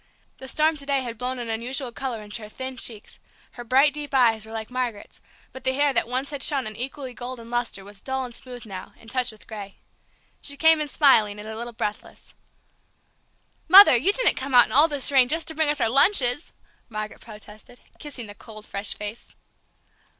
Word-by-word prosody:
The 265 - -8
storm 310 +3 +1
to 280 - -7
day 275 -1 +2
had 235 -3 -7
blown 255 +1 -3
an 240 -1 -5
unusual 240 +3 -3
color 240 -3 -5
into 210 +2 -8
her 210 - -9
thin 260 +3 -6
cheeks, 225 -4 -3 0.3
her 240 - -9
bright, 270 +5 +3
deep 295 -2 -6
eyes 225 -4 +3
were - - -12
like 220 +1 -6
Margaret's, 245 -5 -5 0.3
but 260 - -10
the 260 0 +1
hair 285 +1 +2
that 235 - +1
once 260 +4 -2
had 285 -2 -6
shown 275 -4 +2
an 215 0 -5
equally 260 +2 -6
golden 240 -1 -8
lustre 240 -5 -3
was 205 -1 -13
dull 265 -1 -3
and 245 - -10
smooth 245 0 -10
now, 190 -3 -9
and 225 - -11
touched 255 -2 +1
with 215 - -15
gray. 205 -3 -9 0.6
She 285 -1 -2
came 320 +1 +4
in 300 - -2
smiling, 220 -9 +3
and 210 - -9
a 220 - -6
little 240 +2 -6
breathless. 210 -2 -6 1.3
"Mother, 375 -4 +9
you 290 +12 +2
didn't - - +3
come 265 0 -2
out 245 - +8
in - - -12
all 295 +4 +6
this 285 -3 -1
rain 260 -3 +5
just 325 +4 -1
to - - -6
bring 315 -1 +2
us 295 -1 0
our 230 - +3
lunches!" 275 - +4 0.4
Margaret 215 -1 -6
protested, 215 +2 -14 0.2
kissing 280 -5 -7
the 205 - -10
cold, 215 0 -13
fresh 200 +1 -2
face. 210 +3 -8
250 Hz, 210 wpm, -24 LUFS, 220-275 Hz, 1.3 s, Mother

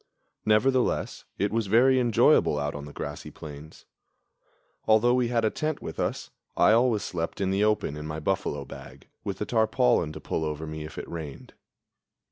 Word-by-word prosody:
Nevertheless 125 +4 +2
it 100 +1 0
was 115 -2 0
very 130 +5 +5
enjoyable 120 -10 +4
out 75 0 -2
on 70 -1 -7
the 75 - -9
great - - -5
grassy - - -7
plains. 75 +1 -11 1.0
Although 110 +3 +5
we 125 -1 +2
had 115 -1 +1
a 110 - +2
tent 155 -1 -2
with - - -7
us, - - -2 0.3
I - - +6
always 115 -1 +3
slept 85 -2 -4
in 95 -1 0
the 100 +2 +2
open 105 -8 +1
in 75 0 -6
my 75 0 -4
buffalo 80 -5 -2
bag, 65 +2 -12 0.2
with 100 -2 -4
the 105 - -3
tarpaulin 110 - +2
to - - -7
pull 80 - -3
over 75 0 -3
me 80 0 -6
if 75 - -10
it - - -5
rained. 80 -5 -8
100 Hz, 185 wpm, -27 LUFS, 75-115 Hz, 1.0 s, I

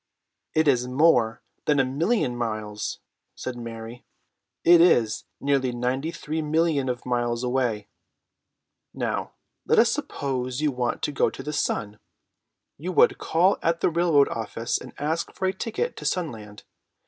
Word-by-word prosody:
"It 155 0 +3
is 125 -3 +3
more 125 -5 +3 0.2
than 150 -2 +3
a 135 - +4
million 145 - 0
miles," 110 -3 -4 0.3
said 130 - -5
Mary. 115 0 -8 0.6
"It 170 0 +7
is 120 -11 +3
nearly 135 -2 +1
ninety 125 +5 -1
three 160 -1 -4
millions 155 -3 +1
of 125 -1 -4
miles 120 -1 -1
away. 125 -5 0 1.1
Now - - -2 0.3
let - - +3
us - - +6
suppose 130 -2 -3
you 150 -1 +1
want 125 -2 -2
to - - 0
go 145 - +2
to - - -9
the 150 - -4
sun. 105 -7 -2 0.8
You 175 +5 -3
would - - +4
call 180 +5 +2
at 165 0 0
the - - +2
railroad 165 -4 +4
office 115 +1 -2
and - - -10
ask 155 +3 -2
for 190 - -2
a 190 - +1
ticket 230 - -3
to - - -8
Sunland. 110 - -3
130 Hz, 150 wpm, -25 LUFS, 120-160 Hz, 1.1 s, It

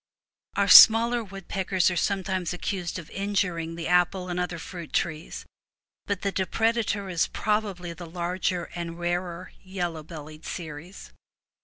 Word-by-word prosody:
Our - - +2
smaller 230 +1 +9
woodpeckers 190 -1 -1
are - - -3
sometimes 190 -1 -1
accused 180 -1 -3
of 170 -3 -10
injuring 185 -5 -1
the 165 -1 -4
apple 180 +1 +2
and 175 0 -2
other 180 -1 -2
fruit 170 0 -9
trees, 155 -1 -2 0.6
but 200 -2 -2
the 200 - 0
depredator 215 +1 0
is 170 -2 +1
probably 200 -5 -2
the 170 -1 -10
larger 175 +1 -2
and 170 -1 -5
rarer 175 +1 -3
yellow 175 -4 -4
bellied 155 0 -10
species. 165 +2 -8
180 Hz, 135 wpm, -26 LUFS, 170-195 Hz, 0.6 s, smaller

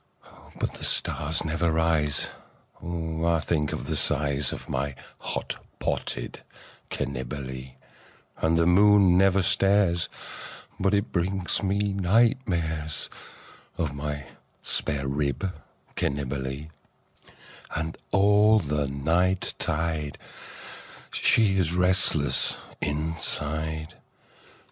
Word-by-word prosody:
But - - -2
the - - -7
stars 80 +3 0
never 80 +1 0
rise 80 -3 +1 0.5
but 80 -1 -4
I - - +1
think 75 -2 -1
of - - -5
the - - -2
size 70 -2 +1
Of - - -7
my 70 +1 -3 0.2
hot - - -3
potted - - -3 0.5
Cannibalee, 65 0 -5 0.6
And 80 +1 +1
the 85 - +3
moon 100 0 +5
never 95 +1 +4
stares 95 -3 +3 0.7
but 95 +2 +2
it 100 +3 -1
brings 90 0 0
me 100 0 0
night 110 +7 +3
mares 80 -4 -3 0.7
Of 80 -4 -2
my 75 0 -5 0.4
spare 70 -3 +4
rib 75 +7 -2 0.4
Cannibalee; 70 +1 -3 1.1
And 80 +1 -3
all 105 +2 +4
the 75 -6 -1
night 85 +7 0
tide 75 -2 -2 0.9
she 105 -4 +4
is 85 -2 +1
restless 90 -7 +4 0.2
inside. 80 0 -2
80 Hz, 100 wpm, -26 LUFS, 75-95 Hz, 1.1 s, moon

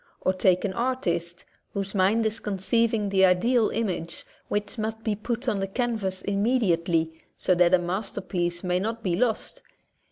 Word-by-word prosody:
Or 185 - +2
take 185 0 +2
an 190 - -2
artist 180 -9 -2 0.3
whose 195 -1 -3
mind 205 +4 +2
is 220 +1 -1
conceiving 210 +2 0
the 190 -1 +3
ideal 215 +6 +4
image 180 -7 -3 0.2
which 210 +3 -2
must 220 +1 -3
be 215 - 0
put 235 +4 -4
on 210 -5 +1
the 195 - -1
canvas 200 -4 -2
immediately 180 -7 +1 0.2
so 185 - +2
that 175 0 +5
a - - +3
masterpiece 175 -1 -2
may 180 0 +1
not 225 +3 -3
be 180 -3 +1
lost. 230 +1 -1
195 Hz, 160 wpm, -26 LUFS, 180-225 Hz, 0.3 s, that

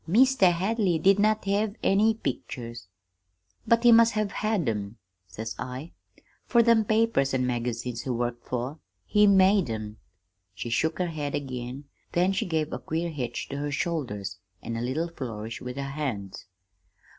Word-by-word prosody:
"'Meester 235 +1 +5
Hadley 190 +1 +1
did 195 +5 +4
not 215 0 +2
have 200 +1 0
any 215 +3 +4
pictures.' 120 - -5 0.8
"'But 230 0 +4
he 240 - +8
must 230 0 +6
have 215 -1 -1
had 215 - -1
'em,' 105 -1 -3 0.3
says 110 +5 -6
I, 130 +6 -6 0.6
'fer 235 -2 +5
them 230 -2 +4
papers 215 -12 +2
an' 130 -1 +1
magazines 120 -1 -2
he 130 - -6
worked 120 -1 -2
for. 125 +5 -4 0.3
He 210 -1 +4
made 195 - +5
'em!' 110 -1 -5 0.6
"She 120 - -5
shook 160 +7 +1
her 180 -1 -1
head 150 -3 -3
again; 130 -1 -5 0.3
then 180 +2 +3
she 190 - -1
gave 160 -2 -1
a - - -3
queer 165 +2 -2
hitch 125 -6 -4
to 140 - -4
her 145 0 -2
shoulders, 110 - -3 0.2
and 115 - -5
a 115 - -3
little 135 +8 -1
flourish 115 -8 -6
with 125 0 -6
her 140 - -2
hands. 120 -13 -4
145 Hz, 165 wpm, -27 LUFS, 120-200 Hz, 0.8 s, he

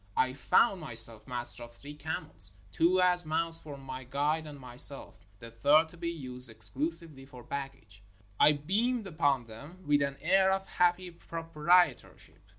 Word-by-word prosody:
I 130 0 +1
found 185 - +1
myself 115 -5 +4
master 120 -1 0
of 120 0 -12
three 145 +4 -12
camels 95 - -6
— 95 - -28
two 180 +3 +1
as 180 -1 +2
mounts 165 +1 +3
for 145 -2 -10
my 130 -1 -9
guide 150 +5 -2
and 145 -1 -11
myself, 125 -6 +1
the 115 +2 -13
third 145 +7 +2
to 175 - -17
be 170 0 -4
used 125 -6 -2
exclusively 135 - +1
for 125 -2 -14
baggage. 135 -7 -9 0.4
I 150 - +5
beamed 210 - -2
upon 145 -8 -1
them 145 +12 -14
with 145 0 +1
an 140 0 -3
air 190 +3 +2
of 195 0 -3
happy 180 0 -1
proprietorship. 165 -2 -1
145 Hz, 160 wpm, -29 LUFS, 125-170 Hz, 0.4 s, I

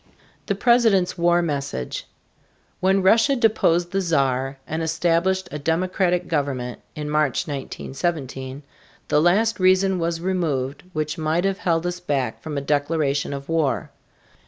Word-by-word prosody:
THE 200 - 0
PRESIDENT'S 220 -5 +3
WAR 175 0 +3
MESSAGE. 140 - -3 0.7
When 190 +1 +2
Russia 225 +8 +5
deposed 180 -7 +2
the 195 - 0
Czar 135 -5 0
and 160 +6 -3
established 170 +3 +1
a 150 - -4
democratic 180 +3 0
government, 135 -5 -2
in 150 -1 -4
March, 150 -3 +1
1917, 135 -1 -4 0.5
the 150 - +4
last 205 +7 +3
reason 185 0 +3
was 165 0 -1
removed 155 -7 -1
which 155 +2 -2
might 160 +3 0
have 195 0 0
held 165 -1 0
us 175 0 -2
back 135 -9 -2
from 155 -2 -5
a - - -1
declaration 145 0 0
of 140 0 -6
war. 160 -4 0
165 Hz, 135 wpm, -23 LUFS, 145-185 Hz, 0.7 s, Russia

